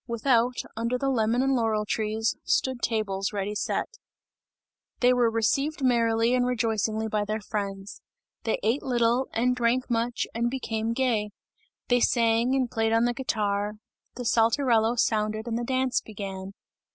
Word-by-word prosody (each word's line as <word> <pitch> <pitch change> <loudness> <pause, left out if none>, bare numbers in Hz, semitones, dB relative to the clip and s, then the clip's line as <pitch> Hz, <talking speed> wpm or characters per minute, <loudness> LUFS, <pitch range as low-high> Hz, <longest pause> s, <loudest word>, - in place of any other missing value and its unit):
Without, 235 +1 +2 0.2
under 235 +3 -1
the 270 +1 0
lemon 235 +1 +1
and 270 0 +2
laurel 220 -4 +1
trees, 220 +1 -1
stood 260 -2 0
tables 200 -3 -1
ready 200 0 -2
set. 210 - -1 1.1
They 250 0 +5
were 245 -2 +3
received 275 +7 0
merrily 230 -1 +2
and 250 -1 +3
rejoicingly 220 -3 0
by 210 -1 0
their 215 +1 -2
friends; 200 -2 -5 0.4
they 225 - 0
ate 230 +7 +1
little 240 0 +1
and 250 +2 +1
drank 245 +1 0
much 235 +1 0
and 235 +1 0
became 230 -3 -2
gay; 230 -5 0 0.6
they 245 0 +3
sang, 235 +1 +2
and 255 -3 0
played 225 0 0
on 230 +1 +3
the 240 - +1
guitar; 210 -5 -1 0.4
the 245 - -6
Saltarello 230 0 +3
sounded 215 -1 0
and 230 - -2
the 240 - -2
dance 260 +1 0
began. 195 -2 -7
230 Hz, 150 wpm, -26 LUFS, 215-245 Hz, 1.1 s, They